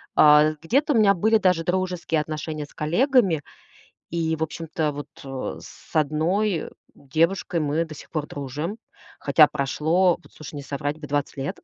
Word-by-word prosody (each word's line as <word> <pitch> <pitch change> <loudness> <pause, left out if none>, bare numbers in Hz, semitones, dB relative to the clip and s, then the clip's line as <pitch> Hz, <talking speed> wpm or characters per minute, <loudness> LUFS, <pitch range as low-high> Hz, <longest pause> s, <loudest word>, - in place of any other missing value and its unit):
Э, 150 +1 +6
где-то 275 - +2
у - - +2
меня 200 -2 +5
были 220 +5 +3
даже 180 -4 +2
дружеские 180 -3 -1
отношения 155 0 -5
с - - -21
коллегами. 190 - +2 0.7
И, 165 -1 0
в 160 - -5
общем-то, 160 -1 -2
вот, 145 0 -7 0.2
э, 135 -1 -5
с - - -15
одной 160 +5 0 0.2
девушкой 165 +5 0
мы 155 +2 0
до 160 -2 -10
сих - - -13
пор 155 -2 -2
дружим. 145 - -5 0.4
Хотя 150 +2 +6
прошло, 160 +7 +1
вот - - -20
слушай, 155 -1 -10
не 145 - -5
соврать 145 +2 -4
бы, 150 - -8
20 145 0 -2
лет. 135 +1 -4
160 Hz, 165 wpm, -24 LUFS, 150-180 Hz, 0.7 s, Э